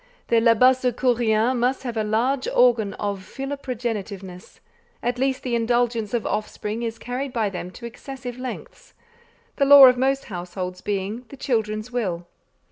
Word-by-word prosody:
The 230 -1 +4
Labassecouriens 245 -1 +3
must 250 +3 0
have 240 -3 -4
a 220 - 0
large 245 +6 0
organ 230 -5 +3
of 200 -1 -3
philoprogenitiveness: 220 -7 -6 0.4
at 245 +1 -1
least 265 0 0
the 250 - -3
indulgence 235 -1 0
of 235 - -2
offspring 215 +1 -3
is 230 -1 -3
carried 255 +4 -4
by 225 -5 -1
them 180 -1 -6
to 235 +6 -11
excessive 250 +1 -8
lengths; 255 -1 -8 0.6
the 275 - +3
law 280 -1 +10
of 250 -1 +5
most 270 +1 +1
households 180 -1 -6
being 205 +4 -3
the 275 - -11
children's 220 -2 -2
will. 185 -8 -2
235 Hz, 145 wpm, -23 LUFS, 210-255 Hz, 0.6 s, law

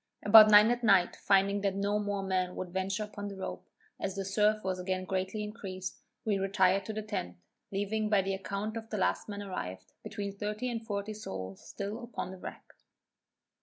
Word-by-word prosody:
About 215 +1 +10
nine 210 +2 +8
at 245 0 -1
night 195 -5 +5
finding 200 0 +3
that 195 -1 0
no 200 +1 +1
more 205 -1 -2
men 185 -1 0
would 180 -1 -5
venture 190 +2 -1
upon 205 -1 -6
the 200 - -6
rope, 190 - -6 0.3
as 195 -1 -3
the 195 -1 -3
surf 210 +2 +2
was 185 -1 -2
again 185 0 -2
greatly 190 +3 -2
increased, 195 -4 -6 0.2
we 205 -3 +1
retired 195 0 +2
to 220 - -4
the 215 0 -4
tent, 145 - -4 0.3
leaving 210 +2 -1
by 205 -2 +4
the 195 +1 -1
account 200 +3 -3
of 225 0 -7
the 215 - -3
last 190 - 0
man 205 0 -5
arrived, 95 - -6
between 200 -1 -5
thirty 210 +5 -3
and 225 -1 -5
forty 205 0 -3
souls 95 - -7
still 205 +4 -5
upon 230 -6 -5
the 190 - -10
wreck. - - -8
200 Hz, 195 wpm, -31 LUFS, 190-210 Hz, 0.3 s, About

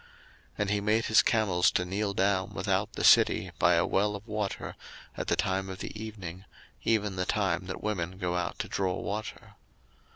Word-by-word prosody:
01:024:011 - - -24 0.5
And 105 -1 0
he 105 -1 +1
made 110 +2 +2
his 110 - +6
camels 95 -6 +3
to 90 - 0
kneel 100 +2 -2
down 95 -1 +1
without - - 0
the - - -4
city - - +5
by 90 - +5
a 85 - +3
well 105 +2 +1
of 100 +1 -9
water 105 -2 -3 0.4
at - - -4
the - - +2
time 95 0 -1
of 95 - -6
the - - -7
evening, 95 -5 -7 0.4
even 105 -4 +1
the 90 - 0
time 95 -3 0
that 95 - -6
women 95 -4 -2
go 90 -2 -2
out 90 -1 -2
to - - -3
draw 95 -2 -1
water. 105 +1 -5
95 Hz, 195 wpm, -29 LUFS, 90-105 Hz, 0.5 s, his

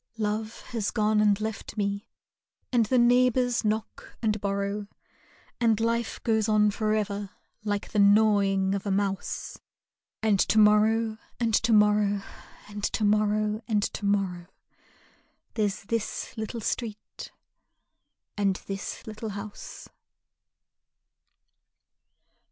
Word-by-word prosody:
Love 215 +1 -3
has 225 -4 -3
gone 215 -1 +2
and 205 -1 +3
left 220 0 -5
me, 200 0 -2 0.7
and 230 -3 +3
the 255 - +2
neighbors 245 0 +3
knock 215 +1 -3
and 215 -2 0
borrow, 200 +1 -2 0.7
And 225 -3 +3
life 230 +1 -1
goes 220 -2 +1
on 210 -1 +4
forever 205 -1 -1 0.3
like 205 -1 -3
the 210 - 0
gnawing 200 -2 +4
of 200 +1 -3
a - - 0
mouse, 195 0 -2 0.6
And 210 -3 +3
to 220 - +2
morrow 215 +1 +4 0.2
and 230 -2 0
to 225 +2 +3
morrow 210 -1 +3 0.4
and 205 0 -8
to 215 - -1
morrow 210 +1 +2
and 210 -3 +1
to - - -4
morrow 190 -4 0 1.1
There's 205 -4 -1
this 230 +2 -3
little 225 +1 -5
street 215 -1 -5 1.0
and 200 -2 +1
this 195 0 -6
little 220 0 -6
house. 200 +1 -8
210 Hz, 115 wpm, -27 LUFS, 200-220 Hz, 1.1 s, on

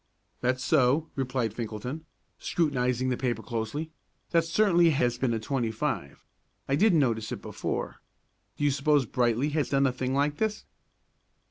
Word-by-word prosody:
"That's 130 +1 0
so," 150 +2 +3
replied 125 -4 -1
Finkelton, 120 +7 -5 0.3
scrutinizing 130 -5 0
the 125 - 0
paper 120 -3 -2
closely. 120 +8 -4 0.4
"That 165 -1 +4
certainly 175 -1 +4
has 125 -5 +1
been 130 -2 +1
a 115 - 0
25. 110 - -3 0.4
I 135 - +2
didn't 190 +1 +4
notice 115 -6 +1
it - - -5
before. - - -4 0.6
Do - - -3
you 145 - +4
suppose 140 0 +2
Brightly 120 +3 +1
has 150 -1 -1
done 140 0 +3
a 130 - +2
thing 130 +1 -2
like 145 +1 +1
this?" 215 +1 -1
130 Hz, 150 wpm, -28 LUFS, 120-150 Hz, 0.6 s, That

